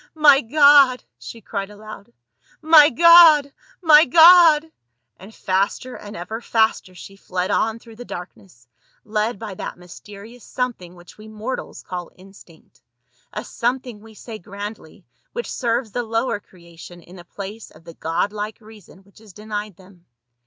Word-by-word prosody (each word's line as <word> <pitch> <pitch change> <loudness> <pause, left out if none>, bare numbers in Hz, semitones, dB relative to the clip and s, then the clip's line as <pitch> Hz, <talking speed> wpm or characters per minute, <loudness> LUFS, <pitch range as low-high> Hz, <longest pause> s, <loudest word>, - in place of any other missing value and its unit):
" - - -42
My 295 -3 +5
God 280 0 +4
!" - - -60
she 230 - -11
cried 195 -1 -6
aloud, 210 - -13 0.3
" - - -34
My 300 -2 +9
God— 320 -1 +6 0.3
my 310 -2 +7
God 325 0 +6 0.2
!" 120 - -54
And 195 +4 -13
faster 200 +5 -3
and 205 0 -11
ever 220 +7 -7
faster 220 -5 -1
she 195 +2 -13
fled 185 -1 -4
on 225 0 -1
through 230 -1 -17
the 245 - -9
darkness, 175 - -12 0.4
led 215 +1 -2
by 210 -1 -8
that 185 - -8
mysterious 205 +6 -14
something 230 -9 -5
which 175 +3 -17
we 215 - -13
mortals 220 +4 -7
call 180 -2 -7
instinct; 185 -3 -20 0.5
a - - -7
something, 245 -2 -4
we 220 0 -17
say 220 0 -10
grandly, 205 +3 -10 0.3
which 480 - -6
serves 235 -2 -2
the 245 - -3
lower 230 -1 -2
creation 175 -2 -16
in 175 - -16
the 175 - -12
place 200 +5 -10
of 155 - -20
the 165 - -13
God 165 +6 -3
like 210 0 -6
reason 210 -3 -18
which 200 +2 -23
is 215 -4 -17
denied 210 -1 -7
them. 185 -1 -21
215 Hz, 165 wpm, -20 LUFS, 190-245 Hz, 0.5 s, My